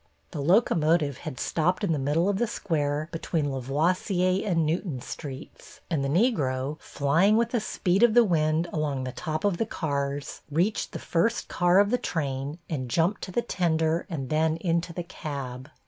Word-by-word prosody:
The - - -4
locomotive 160 - +3
had 130 - -7
stopped 175 +5 0
in 195 - +1
the 155 - +1
middle 150 +6 +1
of 200 -1 +1
the 240 - +1
square 155 -8 -1
between 160 -3 -1
La 135 - -3
voisier 180 - +1
and 170 -6 +1
Newton 160 -3 -1
Streets, 135 +1 -9
and 150 -4 +1
the 140 - -1
Negro, 145 - +1
flying 165 +10 +2
with 235 0 +1
the 240 - +1
speed 195 -2 0
of 240 -2 +5
the 240 - +8
wind 160 -3 +1
along 145 -4 -1
the 130 - -4
top 155 +4 -4
of 200 -4 +2
the 225 - 0
cars, 140 -5 -3
reached 175 +8 0
the - - -3
first 230 +8 0
car 175 +1 +3
of 205 +1 +4
the 250 - +2
train 140 -2 -3
and 130 -6 -3
jumped 170 - +1
to 185 - -6
the 235 +6 0
tender 165 -5 0
and 140 -7 -4
then 160 +1 +2
into 170 0 -1
the 175 +1 -4
cab. 135 -5 -6
160 Hz, 185 wpm, -27 LUFS, 145-185 Hz, -, the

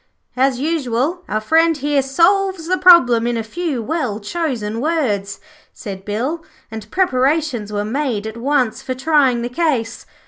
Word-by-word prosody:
'As 260 0 +1
usual, 295 +1 -1
our 215 - 0
friend 320 +8 +2
here 290 0 +1
solves 350 +6 +1
the 370 +2 0
problem 250 -11 +6
in 240 -1 -1
a 225 - -2
few 285 0 -3
well 255 -6 -2
chosen 230 -4 -3
words,' 215 -11 -1 0.3
said 195 -4 -8
Bill, 260 +11 -3 0.3
and 220 -1 -8
preparations 270 - 0
were 205 0 -2
made 235 -3 -2
at 220 0 -6
once 255 -1 0
for 260 -1 -4
trying 265 -4 +2
the 240 - -3
case. 250 -5 -2
260 Hz, 150 wpm, -18 LUFS, 225-320 Hz, 0.3 s, problem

